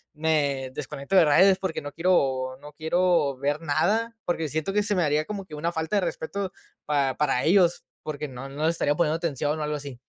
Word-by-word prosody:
me 145 -4 0
desconecto 140 +3 -4
de 180 -3 +7
redes 185 +6 +5
porque 190 -4 -3
no 145 - -7
quiero 135 -7 +1
no 150 0 -11
quiero 160 -2 +1
ver 145 +3 -1
nada. 200 +10 +1
Porque 165 -2 -1
siento 155 +5 -2
que 210 +1 +1
se 205 - 0
me 185 - +1
haría 150 0 +1
como 200 0 -5
que 155 - -9
una 165 +3 -2
falta 160 +3 -2
de 200 - +3
respeto 190 +2 -3 0.3
para 140 -3 +1
para 135 -4 +1
ellos, 175 0 +3 0.2
porque 150 -1 -4
no 135 0 -8
no 145 +3 -3
les 165 +1 +2
estaría 145 -3 +1
poniendo 160 -1 +1
atención, 150 -2 -2
o - - -2
algo 150 0 -2
así. 140 -4 -8
155 Hz, 215 wpm, -26 LUFS, 145-175 Hz, 0.3 s, de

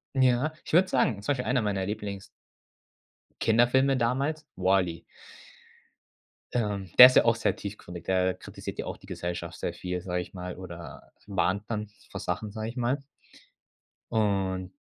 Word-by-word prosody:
Ja, 130 +3 +3
ich - - -5
würde 185 +2 +6
sagen 115 -5 +1
zum 145 - +1
Beispiel 125 -2 -3
einer 125 -2 +2
meiner 100 -2 -1
Lieblings 100 -2 -5 1.2
Kinderfilme 125 +4 +4
damals: 135 +6 0
„WALL-E“. 90 -3 +1 1.5
Ähm, 105 -5 -1
der 125 - +15
ist 125 - +3
ja - - +7
auch 115 -1 +4
sehr - - 0
tiefgründig. 90 -4 -8
Der 95 0 +2
kritisiert - - -8
ja - - -2
auch - - -5
die - - -17
Gesellschaft 85 -1 -5
sehr 85 - -2
viel, 90 +1 -4
sage 90 -1 -2
ich 90 - -9
mal, 90 0 -6
oder 85 -3 -10 0.2
mahnt 100 0 0
dann 105 -1 -2 0.2
vor - - -6
Sachen, 100 +4 -3
sage 110 +1 -4
ich 120 - -8
mal. 125 +3 0 1.1
Und 95 -4 0
105 Hz, 155 wpm, -28 LUFS, 95-120 Hz, 1.5 s, der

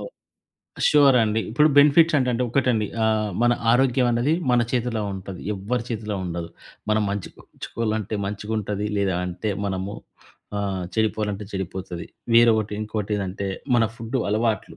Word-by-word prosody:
ఓహ్! - - -7 0.8
షూరండి. 125 -7 +4
ఇప్పుడు 150 +7 +4
బెనిఫిట్స్ 150 +3 +6
అంటంటే 125 -2 0
ఒక్కటండి. 120 -3 +1 0.2
ఆహ్, 110 -1 +1
మన 120 0 +4 0.2
ఆరోగ్యమన్నది 125 +1 +2 0.2
మన 125 -1 +4
చేతిల్లో 120 -3 0
ఉంటది. 95 -1 -8
ఎవ్వరి 115 +5 -2
చేతిలో 110 -3 -3
ఉండదు. 85 -1 -4 0.4
మనం 110 0 +3
మంచిగుంచుకోవాలంటే 110 +2 -4
మంచిగుంటది 105 0 -3
లేదా 95 -3 +1
అంటే 90 +4 -3 0.2
మనము 95 +1 -3 0.6
ఆహ్, 95 -2 -2
చెడిపోవాలంటే 105 -2 -1
చెడిపోతది. 95 -2 -5 0.3
వేరొకటి 115 -2 +5
ఇంకోటి 105 -1 -3
ఏదంటే 100 0 -3 0.3
మన 115 - +4
ఫుడ్డు 115 +3 -3
అలవాట్లు. 110 -1 -1
110 Hz, 120 wpm, -23 LUFS, 100-120 Hz, 0.8 s, బెనిఫిట్స్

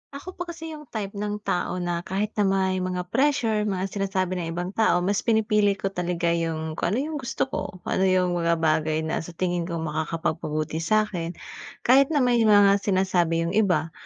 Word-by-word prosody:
Ako 355 +6 -9
pa 355 - -4
kasi 325 -1 -7
'yung 300 -2 -10
type 205 -3 -4
ng 210 0 -2
tao 180 0 -1
na, 175 -1 -1
kahit 195 +4 -2
na 200 - +4
may 190 -1 +1
mga 180 -1 -3
pressure 230 -7 +1
mga 190 -1 -2
sinasabi 190 -2 -1
ng 165 - -3
ibang 180 +2 -3
tao, 200 -5 +2
mas 200 +2 +1
pinipili 210 -2 +2
ko 195 0 -3
talaga 175 -2 -1
'yung 160 -1 -2
kung 180 +5 0
ano - - 0
yung 305 - -3
gusto 245 - -2
ko. 260 - -4
Kung - - -5
ano 190 - +3
'yung 185 -1 +2
mga 170 -1 +1
bagay 160 -1 +1
na 160 - -1
sa 165 +1 -9
tingin 175 -1 -1
ko 170 - -4
makakapagpabuti 155 0 -2
sa'kin, 180 -2 0 0.5
kahit 270 +2 +5
na 290 -5 +1
may 245 -1 +3
mga 205 -2 +5
sinasabi 185 -4 +1
'yung 170 - -2
iba. 175 -6 +1
185 Hz, 195 wpm, -25 LUFS, 170-210 Hz, 0.5 s, kahit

